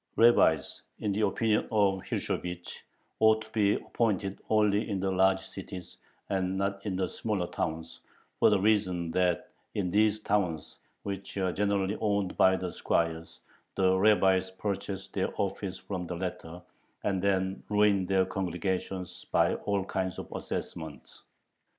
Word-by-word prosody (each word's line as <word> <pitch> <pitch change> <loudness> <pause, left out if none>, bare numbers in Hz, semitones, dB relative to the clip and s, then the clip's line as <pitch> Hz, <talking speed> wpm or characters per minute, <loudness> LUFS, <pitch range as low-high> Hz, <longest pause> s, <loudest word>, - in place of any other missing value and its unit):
Rabbis, 115 -10 +4 0.2
in 105 - -1
the 100 +2 0
opinion 110 -2 +1
of 100 -3 +2
Hirschovich, 90 0 -4 0.4
ought 110 0 +5
to 110 - -16
be 105 -2 +3
appointed 100 -4 -1
only 105 0 +3
in 100 -2 -1
the 95 +1 0
large 95 0 +3
cities, 95 -2 -9 0.3
and 95 -1 -1
not 100 0 -1
in 95 - -1
the 95 0 0
smaller 105 -5 -2
towns, 80 -1 -4 0.4
for - - +6
the 105 -2 +3
reason 95 -5 +1
that 90 0 +1 0.3
in 90 -3 -1
these 105 +2 +3
towns, 90 -7 -1 0.3
which 100 0 -5
are 95 -2 +1
generally 100 0 0
owned 100 -3 0
by 95 0 +5
the 90 -1 -4
squires, 80 0 -1 0.3
the 95 -1 +3
rabbis 95 -2 +4
purchase 95 0 -4
their 95 - -1
office 100 -1 -2
from 90 -3 -5
the 90 - -4
latter, 90 -1 -5 0.4
and 95 -3 0
then 95 -1 0
ruin 105 -3 +3
their 95 -1 +3
congregations 95 0 -3
by - - +3
all 100 -2 -1
kinds 95 -2 -2
of - - -7
assessments. 80 -6 -6
95 Hz, 145 wpm, -29 LUFS, 90-100 Hz, 0.4 s, for